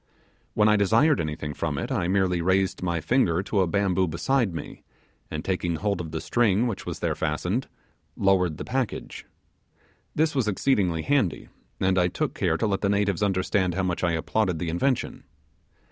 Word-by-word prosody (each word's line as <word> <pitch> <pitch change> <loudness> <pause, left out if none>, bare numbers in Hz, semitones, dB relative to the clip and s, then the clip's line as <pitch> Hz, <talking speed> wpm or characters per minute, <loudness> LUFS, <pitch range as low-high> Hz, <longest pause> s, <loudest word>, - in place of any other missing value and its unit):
When 105 0 +4
I 105 0 +5
desired 115 - +3
anything 75 -1 -4
from 75 -1 -3
it 120 - -3
I 95 -10 0
merely 90 -2 +1
raised 95 +2 +1
my 85 -2 -1
finger 90 - +2
to 100 0 -1
a 95 - +2
bamboo 95 0 +1
beside 115 - 0
me, 80 - -7 0.5
and 75 - -5
taking 90 -3 -1
hold 100 +2 -1
of 80 - -6
the 80 0 -4
string 115 +1 +2
which 115 -6 -4
was - - -5
there - - 0
fastened, 90 - -2 0.5
lowered 90 -5 +2
the - - -6
package. 130 -3 -3 0.9
This 155 0 +2
was 130 -6 0
exceedingly 95 -7 +1
handy, 135 - 0 0.3
and 95 0 +2
I 90 - +3
took - - -2
care - - 0
to - - 0
let 100 -2 0
the 100 - +1
natives 100 -1 +1
understand 95 -2 +1
how 95 - 0
much 90 -1 -2
I 85 -2 +2
applauded 90 +2 0
the 85 +1 -3
invention. 125 +10 -1
95 Hz, 180 wpm, -25 LUFS, 85-105 Hz, 0.9 s, I